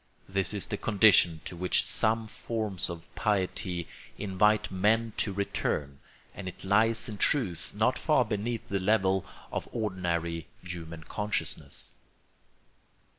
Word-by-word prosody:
This 95 0 0
is 105 -2 -1
the 105 - -3
condition 100 -7 +5
to - - -5
which 90 +1 +2
some 110 +1 +2
forms 110 -4 -2
of 85 -1 -7
piety 95 -3 -1 0.3
invite 105 +2 +2
men 110 +4 +2
to 105 - +1
return; 75 -8 -2 0.3
and 100 - -7
it 90 - -7
lies 110 +5 +3
in 105 -3 -7
truth 110 - +1
not - - +2
far - - +3
beneath 110 +2 -3
the 100 - -1
level 95 -1 +2 0.3
of - - -3
ordinary 85 -6 -2 0.2
human 85 -2 -7
consciousness. 105 +4 -2
100 Hz, 125 wpm, -29 LUFS, 90-110 Hz, 0.3 s, condition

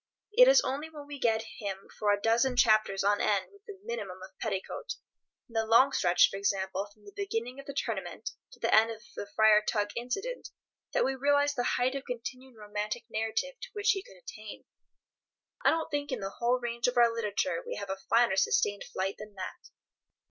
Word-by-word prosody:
It - - +8
is - - +7
only 290 - -3
when 300 -2 -10
we 285 -1 -8
get 225 -2 +2 0.2
him 195 -2 -5
for 210 -1 +3
a 205 - +2
dozen 235 +4 +2
chapters 215 -5 +4
on 205 +1 +3
end 200 -3 +1
with 400 - -20
a 405 - -8
minimum 200 - -4
of 190 - -10
petticoat—in 225 - -7
the 225 -1 +2
long 230 +5 +5
stretch, 180 -7 +4
for 195 - -4
example, 195 0 -1
from 210 0 -23
the 205 - -12
beginning 250 - -3
of 275 - -11
the 280 - -6
Tournament - - -3 0.2
to - - -16
the - - +1
end 220 +1 +6
of 225 0 -7
the 205 - -5
Friar 220 -1 +6
Tuck 210 -1 -1
incident—that 390 - -4
we 270 - +1
realize 285 +2 +2
the 245 -3 0
height 250 +1 +2
of 275 0 -5
continued 255 +1 -6
romantic 210 +2 -4
narrative 225 - -2
to - - -7
which 410 -2 +3
he 390 - -1
could 195 - -16
attain. 215 +3 -10 1.0
I - - +6
don't 325 0 0
think 290 -1 -2
in 255 - -2
the 195 -1 -4
whole 245 +2 +2
range 235 0 -1
of 250 - -1
our 235 -1 +6
literature 230 - -1
we - - -5
have 200 - -5
a 190 - -3
finer 230 -5 +4
sustained 205 +1 +2
flight 190 +1 -2
than 210 -1 -10
that. 185 -1 -7
230 Hz, 200 wpm, -30 LUFS, 205-275 Hz, 1.0 s, It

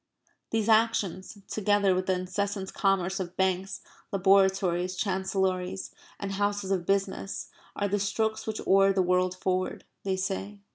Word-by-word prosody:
These 225 -1 0
actions, 215 -3 +2
together 205 -2 +2
with 185 0 -1
the 190 - +3
incessant 190 +2 -3
commerce 195 -1 +1
of 180 -1 -5
banks, 190 +1 0 0.3
laboratories, 190 -2 +3
chancellories, 190 -1 -1 0.3
and 200 -1 -4
houses 205 0 -1
of 180 -3 0
business, 195 0 -1 0.3
are 205 - 0
the 205 +1 0
strokes 220 +2 -1
which 220 -1 -3
oar 195 0 +5
the 190 -1 +2
world 180 0 +2
forward, 185 0 -2 0.2
they 190 -1 0
say. 195 +2 -3
195 Hz, 140 wpm, -28 LUFS, 185-200 Hz, 0.3 s, oar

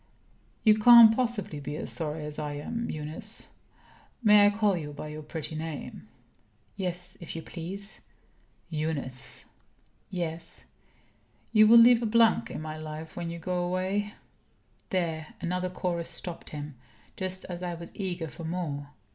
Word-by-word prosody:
"You 215 -1 +6
can't 230 0 +10
possibly 225 - -1
be 145 +1 -5
as - - -4
sorry 155 -2 -2
as 150 0 -6
I 150 -1 -3
am, 230 +11 -4
Eunice. 155 +1 -6 0.7
May 210 -1 +8
I - - +6
call 205 -1 +2
you 150 -4 -5
by 150 +1 -7
your 155 0 -6
pretty 155 +1 -5
name?" 155 -7 -6 0.7
"Yes, 180 -1 -4
if 170 - -7
you 165 - -5
please." 195 +4 -5 0.7
"Eunice!" 150 -5 -4 0.6
"Yes." 170 -2 -4 0.9
"You 215 -1 +7
will 235 +2 +9
leave 235 0 +8
a 230 - 0
blank 230 +1 +4
in - - -5
my 155 0 -5
life 155 +1 -7
when 170 -1 -3
you 170 - -5
go 180 +1 -1
away 190 +4 -1 0.3
" - - -31
There 165 -4 -2
another 180 +1 -1
chorus 175 -2 -2
stopped 175 -2 -6
him, 150 -1 -6 0.4
just 185 0 -3
as 175 -1 -6
I 175 -1 -3
was 170 0 -9
eager 180 -4 -3
for 165 - -9
more. 160 -4 -3
175 Hz, 155 wpm, -28 LUFS, 155-200 Hz, 0.9 s, can't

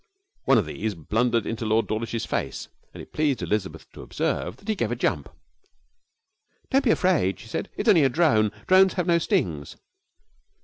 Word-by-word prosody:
One 135 - +5
of 105 - +2
these 100 +7 -4
blundered 115 +7 0
into 115 0 -4
Lord 110 +1 +1
Dawlish's 115 +1 -3
face, - - -4 0.2
and - - -10
it - - -18
pleased 150 -5 0
Elizabeth 105 -3 -3
to - - -11
observe - - -3
that 200 - -20
he 220 - +1
gave 120 - -2
a - - 0
jump. 85 - -1 1.4
'Don't 270 +1 +3
be - - +3
afraid,' 175 - +2
she 115 - -12
said, 115 - -4
'it's 220 - -3
only 180 -8 +6
a 135 - +4
drone. 120 -9 +2
Drones 190 0 +5
have 180 - -1
no 170 -1 +3
stings.' 80 - -1
115 Hz, 180 wpm, -25 LUFS, 110-170 Hz, 1.4 s, only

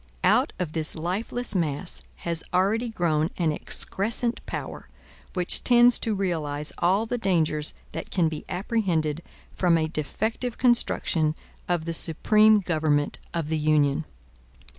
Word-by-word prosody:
Out - - +3
of 175 -4 -3
this 160 -2 -1
lifeless 195 +8 -2
mass 170 -1 -2 0.2
has 170 -1 0
already 205 +6 +1
grown 165 -6 0
an 165 -3 +1
excrescent 225 +9 -1
power, - - -6 0.5
which 180 -1 +3
tends 240 -1 +5
to 220 -2 -1
realize 155 -6 -2
all 190 +6 +2
the 245 +2 -3
dangers 160 -7 +1 0.2
that - - -6
can 175 -4 +1
be 155 -1 -5
apprehended 175 -6 -1 0.3
from 175 -3 +3
a 160 -1 0
defective 220 - -3
construction 170 -10 +2 0.3
of 175 -3 0
the 165 - -3
supreme 210 +7 +4
government 155 -4 0
of 165 -3 -3
the 160 0 -1
Union. 150 0 +2
170 Hz, 135 wpm, -25 LUFS, 155-210 Hz, 0.5 s, tends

